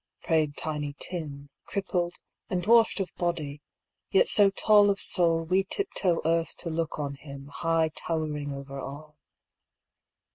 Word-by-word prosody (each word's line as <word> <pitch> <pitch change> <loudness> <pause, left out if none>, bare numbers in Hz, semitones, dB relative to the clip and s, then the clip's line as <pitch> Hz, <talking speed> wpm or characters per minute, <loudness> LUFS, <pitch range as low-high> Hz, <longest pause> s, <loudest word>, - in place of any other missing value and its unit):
" - - -36
prayed 155 -3 +1
Tiny 150 -2 -3
Tim, 145 -5 -6
Crippled, 180 -3 -2 0.3
and 180 -1 -1
dwarfed 230 +1 +4
of 195 - -3
body, 155 -5 -2 0.5
yet 450 +5 +4
so 205 -2 +6
tall 205 +1 +5
Of 200 0 +1
soul, 165 -2 +3
we 185 +4 +2
tiptoe 190 - 0
earth 165 0 0
to 170 - -6
look 160 -1 -2
on 145 -2 -3
him, 140 0 -10
High 165 -1 +1
towering 155 -4 -3
over 140 0 -7
all. 150 +3 -9
165 Hz, 145 wpm, -27 LUFS, 145-185 Hz, 0.5 s, so